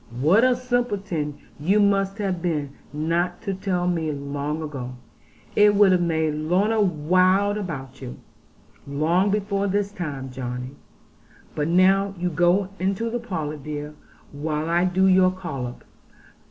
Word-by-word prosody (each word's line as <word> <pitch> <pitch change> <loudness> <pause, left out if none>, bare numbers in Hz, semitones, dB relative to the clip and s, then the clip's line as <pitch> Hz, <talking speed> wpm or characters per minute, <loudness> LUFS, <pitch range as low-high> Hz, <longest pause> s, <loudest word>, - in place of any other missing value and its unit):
What 175 - +4
a 255 -1 +4
simpleton 205 - -2 0.2
you 190 +8 +2
must 195 -1 +2
have 190 -5 -2
been 150 -5 -1 0.2
not 170 +4 -1
to 200 -3 -2
tell 185 -2 -1
me 165 -3 0
long 145 +2 -4
ago. 130 -5 -6 0.6
I 210 0 +6
would 205 -1 +5
have 180 -1 +3
made 160 -2 +1
Lorna 185 +9 +1
wild 185 +3 +3
about 145 - -6
you, 125 -2 -7 0.7
long 165 +7 +1
before 200 -1 0
this 200 +1 0
time, 140 -9 -5
Johnny. 125 0 -5 0.8
But 150 0 -1
now 195 +3 +3
you 180 +1 -1
go 175 +4 +2
into 195 +5 -1
the 240 - -1
parlour, 160 -10 -4
dear, 150 +1 -6 0.4
while 150 +2 -3
I 175 +1 +3
do 185 +1 +2
your 185 -1 +5
collop. 140 -10 -6
175 Hz, 140 wpm, -24 LUFS, 150-195 Hz, 0.8 s, I